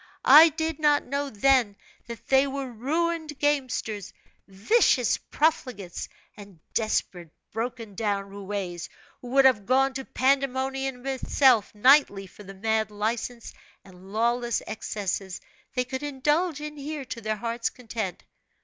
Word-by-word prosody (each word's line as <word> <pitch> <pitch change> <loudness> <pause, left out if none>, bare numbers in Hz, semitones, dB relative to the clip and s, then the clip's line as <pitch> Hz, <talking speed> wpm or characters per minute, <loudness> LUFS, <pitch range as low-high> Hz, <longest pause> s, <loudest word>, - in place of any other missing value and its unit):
I 320 +2 +9
did 320 0 -3
not 295 -1 +3
know 280 +2 -2
then 240 -2 +2 0.3
that 235 -1 -9
they 270 +1 +4
were 275 0 -4
ruined 310 +5 -2
gamesters, 255 -9 -1 0.3
vicious 235 - +2
profligates, 255 - -1 0.3
and 200 -5 -13
desperate 185 -6 -1 0.2
broken 230 -2 -5
down 200 -1 -2
roués, 195 -3 -5 0.3
who 245 - -10
would 270 +2 +4
have 220 -7 +4
gone 265 +2 +3
to 265 0 -5
pandemonium 270 -1 0
itself, 260 -4 +3
nightly, 230 -4 +4
for 190 - -15
the 195 -1 -11
mad 220 +1 0
license 225 +3 -4 0.3
and 190 0 -15
lawless 235 +2 0
excesses 195 -3 -4 0.4
they 250 -1 0
could 260 +1 -5
indulge 295 +3 0
in 300 0 -7
here 290 0 -5
to 240 -2 -7
their 215 0 -2
heart's 230 +1 -2
content. 225 -6 -6
245 Hz, 130 wpm, -26 LUFS, 210-275 Hz, 0.4 s, I